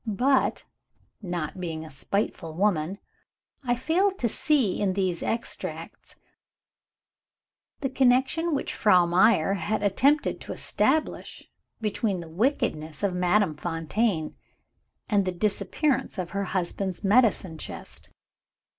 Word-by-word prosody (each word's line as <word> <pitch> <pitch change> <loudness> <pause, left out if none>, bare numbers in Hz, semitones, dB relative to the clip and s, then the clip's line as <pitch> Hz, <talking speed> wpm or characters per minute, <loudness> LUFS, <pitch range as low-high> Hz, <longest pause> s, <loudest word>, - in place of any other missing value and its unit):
But 260 +6 +1 0.6
(not 175 -3 -4
being 160 -3 -4
a 155 - -11
spiteful 165 +1 -2
woman) 185 -1 +1 0.7
I 245 -2 +1
failed 365 +10 +1
to 235 - 0
see, 260 -7 +1
in 195 -2 +1
these 185 -3 -1
extracts, 230 - -5 1.7
the 270 - -1
connection 265 +6 +2
which - - -2
Frau 185 -5 +4
Meyer 185 +1 +4
had 200 +4 -2
attempted 275 +9 +2
to - - -6
establish 315 0 -1 0.3
between 210 -2 -1
the 170 -1 -9
wickedness 160 - -1
of 200 -2 +1
Madame 180 -1 +2
Fontaine 165 +2 -1 0.7
and 205 -4 +2
the 185 - -1
disappearance 215 - -1
of 180 -2 -4
her 200 0 -2
husband's 185 +1 -2
medicine 200 -6 +3
chest. - - -8
200 Hz, 115 wpm, -26 LUFS, 175-245 Hz, 1.7 s, Frau